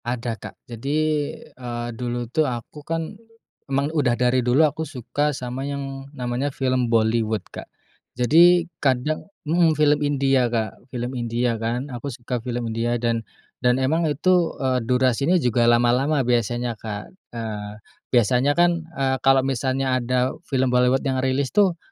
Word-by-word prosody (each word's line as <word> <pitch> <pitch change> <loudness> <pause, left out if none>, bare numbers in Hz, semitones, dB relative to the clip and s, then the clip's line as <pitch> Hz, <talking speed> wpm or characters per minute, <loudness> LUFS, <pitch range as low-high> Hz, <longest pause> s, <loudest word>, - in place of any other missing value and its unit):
Ada 120 -1 -2
kak, 110 - -10
jadi, 130 +5 -3 0.6
eee, 120 -1 -5
dulu 120 +1 -3
tuh 155 -3 +2
aku 125 +5 -7
kan, 165 +4 -3 0.6
emang 140 +3 0
udah 130 -6 +1
dari 125 0 +2
dulu 125 +6 +4
aku 155 +1 -2
suka 145 0 -2
sama 130 -2 -4
yang 135 -1 -5
namanya 125 +3 -2
film 130 -3 0
Bollywood 110 -3 +1
Kak, - - -8 0.5
jadi 170 +7 +5 0.2
kadang 140 +7 0 0.2
mhm 160 0 +3
film 150 -1 +3
India 135 -3 +2
Kak, 110 -2 -3
film 125 0 -4
India 120 0 -1
kan 125 +4 -2
aku 125 +4 -5
suka 120 -1 -4
film 120 -2 -3
India, 120 +1 0
dan 115 -1 0 0.4
dan 125 0 +3
emang 155 +5 +1
itu, 175 +4 +2
eee, 130 -2 0
durasinya 130 +7 +2
juga 120 -5 +2
lama-lama 120 +5 +3
biasanya, 120 0 0
Kak. 105 -2 -6 0.2
Eee, 105 -3 -6 0.3
biasanya 125 +5 +3
kan, 175 -1 +3 0.2
eee, 135 -1 +1
kalau 135 0 +4
misalnya 130 0 0
ada 125 +1 0 0.2
film 130 -2 +1
Bollywood 125 +2 +3
yang 130 -1 0
rilis 130 +1 0
tuh 195 -4 +3
130 Hz, 150 wpm, -23 LUFS, 120-140 Hz, 0.6 s, jadi